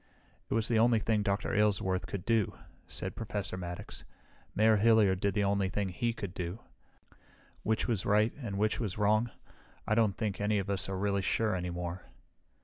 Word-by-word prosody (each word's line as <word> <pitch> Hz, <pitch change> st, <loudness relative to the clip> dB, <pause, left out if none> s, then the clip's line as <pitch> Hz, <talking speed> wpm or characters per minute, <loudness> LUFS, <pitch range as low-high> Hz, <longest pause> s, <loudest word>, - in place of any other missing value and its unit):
"It -, -, 0 dB
was 115 Hz, -1 st, +1 dB
the 115 Hz, -2 st, +2 dB
only 115 Hz, 0 st, +5 dB
thing 110 Hz, 0 st, +1 dB
Dr. 100 Hz, -1 st, -1 dB
Aylesworth 100 Hz, -3 st, +1 dB
could 95 Hz, -3 st, -5 dB
do," 115 Hz, -4 st, +1 dB, 0.3 s
said -, -, -4 dB
Professor 105 Hz, -4 st, -4 dB
Maddox. 90 Hz, -1 st, -7 dB, 0.5 s
"Mayor 110 Hz, 0 st, +5 dB
Hilliard 105 Hz, -3 st, +4 dB
did 100 Hz, 0 st, 0 dB
the 105 Hz, -, +2 dB
only 100 Hz, -1 st, +1 dB
thing 100 Hz, 0 st, -1 dB
he 115 Hz, +6 st, -1 dB
could 100 Hz, -5 st, -6 dB
do. 90 Hz, +1 st, -4 dB, 1.0 s
Which 110 Hz, 0 st, 0 dB
was 110 Hz, -6 st, 0 dB
right, 105 Hz, +2 st, +3 dB
and 100 Hz, -6 st, -4 dB
which 105 Hz, +1 st, +1 dB
was 105 Hz, -7 st, -3 dB
wrong 110 Hz, +3 st, +3 dB, 0.6 s
I -, -, +1 dB
don't 110 Hz, -4 st, +2 dB
think 105 Hz, -3 st, -2 dB
any 105 Hz, +1 st, +2 dB
of 100 Hz, 0 st, -1 dB
us 95 Hz, -1 st, -1 dB
are 95 Hz, -, -2 dB
really 100 Hz, 0 st, 0 dB
sure 110 Hz, +3 st, +1 dB
any 90 Hz, -1 st, -3 dB
more." 85 Hz, +1 st, -5 dB
105 Hz, 185 wpm, -31 LUFS, 95-110 Hz, 1.0 s, only